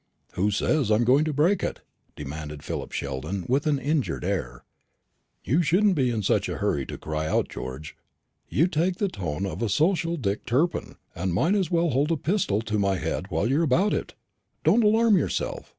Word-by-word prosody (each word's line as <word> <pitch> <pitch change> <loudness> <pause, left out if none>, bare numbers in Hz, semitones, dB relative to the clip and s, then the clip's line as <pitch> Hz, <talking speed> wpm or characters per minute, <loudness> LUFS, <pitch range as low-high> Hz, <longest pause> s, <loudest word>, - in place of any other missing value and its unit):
"Who 100 +4 0
says 120 +5 +1
I 105 - +5
am 115 - +2
going 135 +6 +4
to 155 - -1
break 165 +7 +2
it?" - - -3 0.3
demanded 75 +1 -7
Philip - - -5
Sheldon 70 +8 -4
with 140 +5 +1
an 150 -2 +2
injured 145 +1 -1
air. - - -3 0.8
"You 150 +8 +2
shouldn't 190 +5 +3
be 135 -7 +1
in 110 -3 -2
such - - +1
a - - -3
hurry 70 -2 -1
to - - -6
cry 80 0 -3
out, - - 0
George. 65 +4 -7 0.5
You 160 - +3
take 175 +1 0
the 200 +2 0
tone 90 - -3
of 100 - -5
a 115 - 0
social 165 - +1
Dick 100 -7 -2
Turpin, 135 +9 0 0.2
and 90 0 -2
might 165 - +2
as 195 -4 +1
well 170 -2 +2
hold 140 +5 +1
a 165 - +1
pistol 155 - 0
to 105 -2 -1
my 100 -1 +1
head - - -3
while 105 - 0
you're 140 +6 +2
about 170 +7 +2
it. - - -3 0.5
Don't 235 - +4
alarm 220 0 +4
yourself. - - -3
135 Hz, 200 wpm, -25 LUFS, -, 0.8 s, I